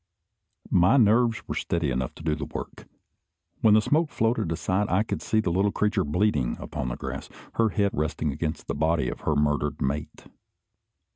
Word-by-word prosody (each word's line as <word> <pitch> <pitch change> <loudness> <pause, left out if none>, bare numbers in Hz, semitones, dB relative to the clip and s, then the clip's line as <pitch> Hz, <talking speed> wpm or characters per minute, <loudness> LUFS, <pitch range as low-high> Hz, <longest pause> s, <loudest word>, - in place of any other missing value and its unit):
My 90 +9 +5
nerves 115 0 +3
were - - -3
steady 85 -5 -1
enough 65 0 -2
to - - -11
do 80 -1 +1
the 75 0 -4
work. - - -8 0.7
When 105 -1 +6
the 110 - +4
smoke 155 +5 +2
floated 115 - 0
aside, 95 +5 0
I 95 +4 +2
could - - -4
see 110 - +1
the 95 - -1
little 95 +4 +2
creature 105 +1 +1
bleeding 75 - 0
upon 75 -5 -4
the - - -3
grass, - - -6 0.3
her 110 - +4
head 100 -1 +1
resting 75 0 -1
against 75 +3 -4
the - - -3
body 80 -3 +1
of - - -6
her 80 - 0
murdered 75 0 0
mate. 70 +3 -3
85 Hz, 185 wpm, -26 LUFS, 75-105 Hz, 0.7 s, When